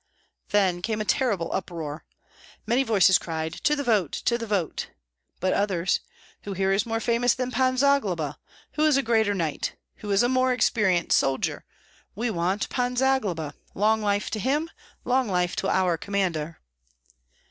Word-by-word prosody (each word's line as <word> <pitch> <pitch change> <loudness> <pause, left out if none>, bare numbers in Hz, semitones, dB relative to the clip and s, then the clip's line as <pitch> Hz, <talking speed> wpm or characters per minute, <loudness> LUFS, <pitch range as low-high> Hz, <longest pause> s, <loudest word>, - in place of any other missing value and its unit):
Then 190 -4 +2
came 215 +3 -2
a 215 - -2
terrible 205 -9 0
uproar. 165 -5 -5 0.6
Many 245 +3 +2
voices 195 -7 +4
cried, 160 -1 -4
"To 300 - +3
the 285 - -3
vote! 210 - +1
to 235 - 0
the 230 -1 -4
vote!" 195 -6 -2 0.5
but 185 +1 +1
others, 190 -3 +1 0.4
"Who 200 - -5
here 190 +1 0
is 200 +4 +1
more 225 0 -1
famous 235 +1 +2
than 255 -1 -3
Pan 255 0 +1
Zagloba? 210 - +1 0.3
Who 305 - +1
is 295 -3 +4
a 275 - +1
greater 220 -3 +2
knight? 165 -5 -2 0.2
Who 210 - -8
is 200 +2 +3
a - - +3
more 255 0 +2
experienced 195 -7 +2
soldier? 135 -1 -1 0.5
We 230 +3 -1
want 185 +2 -1
Pan 250 0 -1
Zagloba! 215 - 0 0.2
Long 220 +2 +2
life 205 -1 0
to 215 - -2
him! 295 - 0 0.3
Long 255 0 +2
life 180 -2 0
to 195 - -1
our 180 -3 +2
commander!" 175 -6 -2
205 Hz, 165 wpm, -25 LUFS, 180-245 Hz, 0.6 s, voices